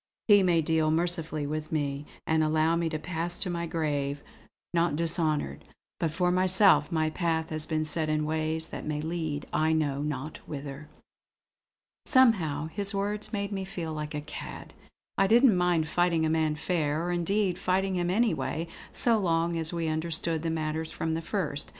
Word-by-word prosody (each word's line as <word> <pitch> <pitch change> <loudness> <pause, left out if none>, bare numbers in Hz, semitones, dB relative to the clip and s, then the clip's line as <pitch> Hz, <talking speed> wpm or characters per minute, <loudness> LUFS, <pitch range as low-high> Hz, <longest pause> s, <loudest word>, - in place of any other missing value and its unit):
He 205 -2 +7
may 175 -3 +3
deal 160 0 +2
mercifully 160 -2 -1
with 155 +1 -4
me, 145 -2 -2 0.2
and 160 0 +2
allow 155 +1 +2
me 170 -1 0
to 155 - -2
pass 170 +2 -3
to 180 - -1
my 170 0 -2
grave 145 -3 -2 0.5
not 170 -3 +2
dishonoured; 155 - 0 0.4
but 165 - +1
for 180 +3 +1
myself 185 +2 +4
my 155 -1 +1
path 160 -2 -1
has 155 0 -2
been 155 -1 0
set 155 0 -1
in 155 0 +1
ways 160 +1 -1
that - - -6
may 150 -1 -2
lead 160 -2 -3
I 155 +1 +2
know 145 -3 0
not 150 0 -4
whither." 140 0 -7 1.2
Somehow 180 - +4
his 200 +3 +2
words 210 +2 -2
made 200 -2 -2
me 195 -1 -2
feel 175 -5 -5
like 150 0 -5
a 150 - -2
cad. - - -8 0.5
I 195 - +5
didn't 235 0 +6
mind 175 -3 +2
fighting 170 -1 +2
a 155 - +1
man 160 -1 +1
fair; 155 -1 -1
or 175 - -1
indeed 180 +1 0
fighting 190 +1 +1
him 175 -1 0
anyway, 190 -5 0 0.2
so 230 -2 +3
long 170 -2 +1
as 160 -1 -1
we 170 -2 -2
understood 160 0 -1
the 165 - -2
matter 160 0 -2
from 160 0 -3
the 165 - -2
first. 165 -5 -3
160 Hz, 175 wpm, -28 LUFS, 155-180 Hz, 1.2 s, He